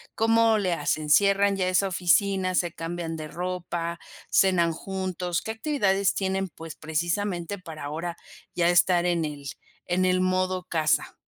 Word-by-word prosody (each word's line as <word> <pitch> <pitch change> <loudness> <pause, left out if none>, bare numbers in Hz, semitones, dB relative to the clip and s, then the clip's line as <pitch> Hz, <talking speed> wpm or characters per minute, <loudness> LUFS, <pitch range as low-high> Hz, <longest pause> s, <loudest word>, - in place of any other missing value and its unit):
¿Cómo 225 0 +4
le 190 -3 0
hacen? 150 -1 -1
¿Cierran 200 +2 +4
ya 185 - 0
esa 185 +1 +2
oficina, 185 +1 +2
se 175 -2 +1
cambian 165 -1 -5
de 155 -1 -6
ropa, 175 -1 -4 0.3
cenan 175 -3 +4
juntos? 185 -1 -3
¿Qué 220 - -4
actividades 215 -6 +1
tienen, 190 0 -1
pues, 165 0 -10
precisamente 175 +4 -2
para 160 -5 -9
ahora 165 +4 -4 0.4
ya 175 -1 +3
estar 175 0 +4
en 170 -2 +1
el 145 -2 -7 0.4
en 180 +1 +1
el 185 0 +2
modo 185 0 0
casa? 160 -4 0
180 Hz, 150 wpm, -26 LUFS, 165-190 Hz, 0.4 s, Cómo